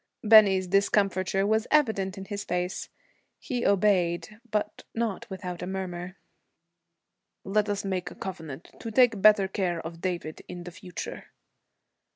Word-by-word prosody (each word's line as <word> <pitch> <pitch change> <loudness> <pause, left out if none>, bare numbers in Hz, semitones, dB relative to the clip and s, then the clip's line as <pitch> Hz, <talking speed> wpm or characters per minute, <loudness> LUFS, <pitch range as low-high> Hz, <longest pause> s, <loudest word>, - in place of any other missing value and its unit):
Bennie's 205 -4 +7
discomfiture 195 0 +2
was 220 +2 +1
evident 220 -11 +2
in 195 - -7
his 200 0 -5
face. 180 +2 -3 0.5
He 245 -4 -3
obeyed, 200 0 +2
but 210 -1 -2
not 225 -4 -2
without 180 -3 -6
a 180 - -4
murmur. 185 -1 -5 1.3
'Let 210 +2 +1
us 205 -1 -2
make 185 -2 -2
a - - -12
covenant 165 -5 -7
to 230 - -5
take 230 -3 +4
better 210 -1 +6
care 185 -3 -1
of 165 +1 -8
David 175 -4 -3
in 175 -1 -7
the 175 - -8
future.' 180 -1 -7
195 Hz, 140 wpm, -27 LUFS, 180-210 Hz, 1.3 s, Bennie's